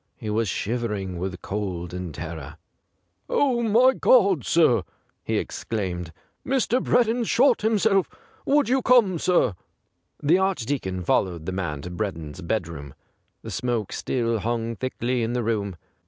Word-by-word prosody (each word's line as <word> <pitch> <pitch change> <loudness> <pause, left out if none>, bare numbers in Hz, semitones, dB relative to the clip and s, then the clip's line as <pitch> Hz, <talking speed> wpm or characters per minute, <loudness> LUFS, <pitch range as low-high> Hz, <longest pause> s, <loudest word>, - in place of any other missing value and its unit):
He 105 - -4
was 110 -1 0
shiver 115 +3 -2
ing 95 -3 -5
with 95 0 -5
cold 90 -4 -4
and 90 -2 -5
terror. 80 -1 -7 0.4
' 90 +2 -48
Oh, 255 -4 +2
my 235 +4 +5
God, 195 - +4
sir 125 - +4 0.2
!' - - -44
he - - -1
exclaimed, 90 -6 -3 0.2
' - - -44
Mr. 260 -1 +1
Breddon's 235 -1 +2
shot 265 +4 +4
himself. 210 -3 +2 0.4
Would 290 0 +3
you 260 +2 +2
come, 225 -9 +4
sir.^' 160 - +2 0.6
The 165 +6 +3
Archdeacon 130 - -1
followed 85 -2 0
the 95 - -2
man 85 -7 -3
to 90 - -6
Breddon's 90 -4 -4
bedroom. 85 - -4 0.5
The - - -7
smoke 120 -5 -2
still 115 -3 -1
hung 115 +1 -2
thickly 125 -1 -2
in 115 +1 -1
the 125 -1 -1
room. 105 -4 -1
115 Hz, 155 wpm, -24 LUFS, -, 0.6 s, my